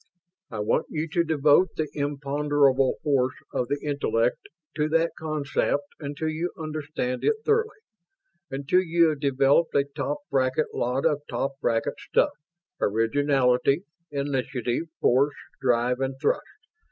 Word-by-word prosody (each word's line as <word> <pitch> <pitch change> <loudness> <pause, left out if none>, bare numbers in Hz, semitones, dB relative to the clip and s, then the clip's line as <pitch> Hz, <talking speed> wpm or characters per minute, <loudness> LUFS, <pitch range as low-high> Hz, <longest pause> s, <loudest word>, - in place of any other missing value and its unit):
I 110 -3 -4
want 105 +8 +1
you 155 +1 -2
to 170 +2 +2
devote 155 +2 +3
the 155 - -1
imponderable 145 -2 +1
force 130 -4 +1 0.2
of 125 - -1
the 145 +2 -1
intellect 125 -5 0 0.3
to 150 0 +1
that 165 +1 +2
concept 145 -2 -1
until 145 +2 -4
you 160 +3 -2
understand 155 -5 -3
it 445 - +3
thoroughly. 445 0 +1 0.7
Until 140 +7 +1
you 170 -2 +3
have 150 -2 -3
developed 140 +3 +2
a 140 - +5
top 140 0 -3
bracket 130 +2 +1
lot 125 +3 -1
of 150 -3 +2
top 135 - -1
bracket 115 0 0
stuff - - +2 0.5
originality, 130 - +2 0.3
initiative, 135 -1 -2
force, 135 +3 +3 0.3
drive, 125 0 +2
and 135 0 -1
thrust. 145 - +1
145 Hz, 130 wpm, -26 LUFS, 130-155 Hz, 0.7 s, a